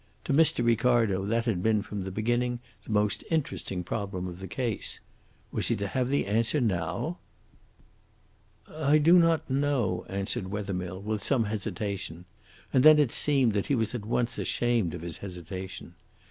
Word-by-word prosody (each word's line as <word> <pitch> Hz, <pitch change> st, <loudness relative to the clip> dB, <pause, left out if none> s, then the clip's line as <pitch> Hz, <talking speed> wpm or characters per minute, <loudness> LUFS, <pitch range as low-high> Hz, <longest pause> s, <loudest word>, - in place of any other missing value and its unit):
To -, -, -1 dB
Mr. 145 Hz, -5 st, +4 dB
Ricardo 115 Hz, -4 st, +2 dB
that 115 Hz, +2 st, 0 dB
had 105 Hz, -7 st, 0 dB
been 110 Hz, 0 st, +2 dB
from 105 Hz, -3 st, -5 dB
the 95 Hz, -, -4 dB
beginning 120 Hz, +4 st, 0 dB, 0.2 s
the -, -, -9 dB
most 105 Hz, -1 st, +1 dB
interesting 140 Hz, -, -2 dB
problem 95 Hz, -1 st, -4 dB
of 90 Hz, -1 st, -7 dB
the 95 Hz, -, -7 dB
case. 115 Hz, +2 st, -3 dB, 0.5 s
Was -, -, -1 dB
he -, -, +2 dB
to 100 Hz, -1 st, -3 dB
have 130 Hz, +2 st, -1 dB
the 140 Hz, -, +1 dB
answer 115 Hz, +8 st, +1 dB
now? 95 Hz, -, -1 dB, 1.5 s
"I 155 Hz, -1 st, +2 dB
do 155 Hz, +3 st, +5 dB
not 165 Hz, -1 st, +2 dB
know," 130 Hz, -10 st, 0 dB
answered 95 Hz, -1 st, -2 dB
Wethermill, 95 Hz, -2 st, -4 dB
with 105 Hz, -1 st, -2 dB
some 130 Hz, -5 st, +2 dB
hesitation, 100 Hz, -4 st, -4 dB, 0.5 s
and 130 Hz, -, +5 dB
then 155 Hz, 0 st, +9 dB
it 145 Hz, -6 st, +3 dB
seemed 135 Hz, -6 st, +4 dB
that 100 Hz, -1 st, -1 dB
he 140 Hz, -, +2 dB
was 110 Hz, -2 st, -1 dB
at 120 Hz, -4 st, -4 dB
once 120 Hz, +1 st, -1 dB
ashamed 115 Hz, -8 st, 0 dB
of 85 Hz, -, -8 dB
his 85 Hz, -2 st, -5 dB
hesitation. 95 Hz, 0 st, -7 dB
110 Hz, 165 wpm, -28 LUFS, 95-125 Hz, 1.5 s, then